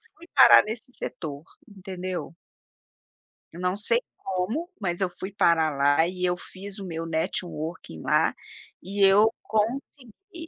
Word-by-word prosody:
fui 340 Hz, -, -16 dB
parar 265 Hz, -, +9 dB
nesse 220 Hz, +3 st, -7 dB
setor, 150 Hz, -2 st, -6 dB, 0.2 s
entendeu? 185 Hz, -5 st, -6 dB, 1.2 s
Eu 170 Hz, -, -10 dB
não 180 Hz, +1 st, 0 dB
sei 230 Hz, +3 st, +2 dB, 0.2 s
como, 205 Hz, -, -3 dB
mas 175 Hz, -3 st, -2 dB
eu 185 Hz, -, +1 dB
fui 190 Hz, +3 st, -7 dB
parar 160 Hz, -5 st, +3 dB
lá 145 Hz, +4 st, +3 dB
e 180 Hz, 0 st, -5 dB
eu 180 Hz, 0 st, +1 dB
fiz 195 Hz, +2 st, -10 dB
o 195 Hz, -, -6 dB
meu 165 Hz, -1 st, -4 dB
networking 160 Hz, -, -3 dB
lá, -, -, +2 dB, 0.5 s
e 200 Hz, +2 st, -4 dB
eu 205 Hz, +3 st, +6 dB
consegui, 270 Hz, -, -4 dB
185 Hz, 140 wpm, -26 LUFS, 170-215 Hz, 1.2 s, parar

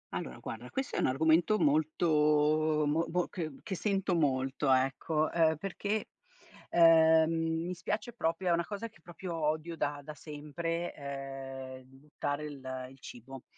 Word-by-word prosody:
Allora -, -, -4 dB
guarda 120 Hz, +2 st, -7 dB
questo 270 Hz, +1 st, -3 dB
è -, -, 0 dB
un -, -, +3 dB
argomento 160 Hz, +9 st, +3 dB
molto 155 Hz, -1 st, +3 dB
mo 160 Hz, +3 st, +1 dB
mo 180 Hz, +1 st, 0 dB
che 160 Hz, -4 st, -4 dB
che 195 Hz, -, -3 dB
sento 195 Hz, -1 st, 0 dB
molto 135 Hz, -3 st, +1 dB
ecco, 135 Hz, +4 st, +2 dB
uhm, 160 Hz, -2 st, +3 dB
perché, 200 Hz, +4 st, -3 dB, 0.6 s
uhm, 165 Hz, 0 st, +5 dB
mi 180 Hz, -, -3 dB
spiace 210 Hz, +6 st, -3 dB
proprio 175 Hz, -3 st, -1 dB
è -, -, +4 dB
una 170 Hz, 0 st, +2 dB
cosa 215 Hz, +2 st, -5 dB
che 205 Hz, -, -23 dB
proprio 175 Hz, +1 st, -7 dB
odio 155 Hz, +1 st, -1 dB
da 145 Hz, -2 st, -2 dB
da 155 Hz, +2 st, -7 dB
sempre, 160 Hz, +3 st, -4 dB
ehm, 135 Hz, -2 st, -7 dB
il 135 Hz, -, -17 dB
buttare 145 Hz, +1 st, -4 dB
il, 145 Hz, -3 st, -8 dB
ehm, 130 Hz, -1 st, -5 dB
il 135 Hz, -, -17 dB
cibo. 125 Hz, +1 st, -10 dB
155 Hz, 160 wpm, -31 LUFS, 140-170 Hz, 0.6 s, uhm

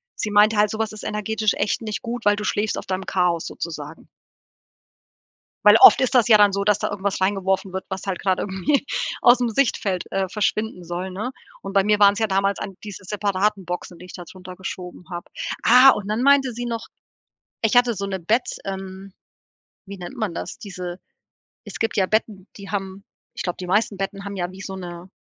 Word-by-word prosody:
Sie 210 Hz, -, -3 dB
meinte 210 Hz, +2 st, +5 dB
halt: 210 Hz, 0 st, +4 dB
„So 220 Hz, -, -5 dB
was 220 Hz, -1 st, -1 dB
ist 215 Hz, -, -9 dB
energetisch 215 Hz, 0 st, -1 dB
echt 210 Hz, -, -1 dB
nicht 215 Hz, -2 st, -4 dB
gut, 240 Hz, -1 st, -5 dB
weil 205 Hz, 0 st, +4 dB
du 210 Hz, -, -4 dB
schläfst 210 Hz, +1 st, -1 dB
auf -, -, -6 dB
deinem 190 Hz, 0 st, -3 dB
Chaos 175 Hz, -3 st, 0 dB
sozusagen.“ 160 Hz, -1 st, -7 dB, 1.6 s
Weil 210 Hz, +1 st, +8 dB
oft -, -, +9 dB
ist 260 Hz, 0 st, 0 dB
das 245 Hz, -2 st, +4 dB
ja 215 Hz, -2 st, +7 dB
dann 205 Hz, -1 st, +5 dB
so, 200 Hz, +1 st, -1 dB
dass 210 Hz, 0 st, +3 dB
da -, -, -2 dB
irgendwas 200 Hz, -1 st, -2 dB
reingeworfen 190 Hz, -1 st, 0 dB
wird, 190 Hz, 0 st, -4 dB
was 190 Hz, 0 st, -6 dB
halt 190 Hz, -2 st, -3 dB
grad 190 Hz, -2 st, +1 dB
irgendwie 210 Hz, +9 st, 0 dB, 0.3 s
ausm 245 Hz, 0 st, +5 dB
Sichtfeld, 205 Hz, -6 st, 0 dB
äh, 195 Hz, -1 st, -1 dB
verschwinden 210 Hz, -1 st, -2 dB
soll, 175 Hz, +2 st, -4 dB
ne? 210 Hz, +7 st, -4 dB, 0.3 s
Und 195 Hz, -, -6 dB
bei 195 Hz, -1 st, +4 dB
mir 210 Hz, 0 st, +3 dB
waren's 200 Hz, 0 st, +5 dB
ja 220 Hz, -, +2 dB
damals 195 Hz, 0 st, 0 dB
an 195 Hz, -, -6 dB
diese 205 Hz, -2 st, -9 dB
separaten 200 Hz, 0 st, -1 dB
Boxen, 175 Hz, 0 st, -6 dB
die 180 Hz, -, -11 dB
ich 180 Hz, -, -12 dB
da 175 Hz, -, -8 dB
druntergeschoben 180 Hz, 0 st, -9 dB
habe. 175 Hz, 0 st, -7 dB, 0.3 s
Ah, 255 Hz, +2 st, +8 dB
und 205 Hz, -5 st, -2 dB
dann 220 Hz, +4 st, -1 dB
meinte 275 Hz, -2 st, +4 dB
sie 240 Hz, +1 st, -5 dB
noch, 230 Hz, -1 st, -4 dB, 0.8 s
ich 225 Hz, +1 st, +1 dB
hatte 245 Hz, -1 st, +4 dB
so 200 Hz, -2 st, -4 dB
'ne 195 Hz, -1 st, -3 dB
Bett 220 Hz, +9 st, +1 dB, 0.2 s
ähm, 190 Hz, 0 st, -7 dB, 0.7 s
wie 200 Hz, 0 st, -9 dB
nennt 175 Hz, -1 st, -8 dB
man 215 Hz, -7 st, -2 dB
das? -, -, -6 dB
Diese 180 Hz, -3 st, -7 dB, 0.7 s
es -, -, -8 dB
gibt 225 Hz, -1 st, -1 dB
ja 190 Hz, -, +4 dB
Betten, 210 Hz, -1 st, -1 dB
die 200 Hz, -1 st, -10 dB
haben 195 Hz, -1 st, -4 dB, 0.3 s
ich -, -, -6 dB
glaube, 175 Hz, -, -3 dB
die 180 Hz, -, -6 dB
meisten 205 Hz, +1 st, +1 dB
Betten 195 Hz, 0 st, -4 dB
haben 200 Hz, 0 st, -5 dB
ja 175 Hz, 0 st, -3 dB
wie 190 Hz, +1 st, -11 dB
so 190 Hz, 0 st, -6 dB
'ne 175 Hz, 0 st, -8 dB
200 Hz, 205 wpm, -22 LUFS, 185-215 Hz, 1.6 s, oft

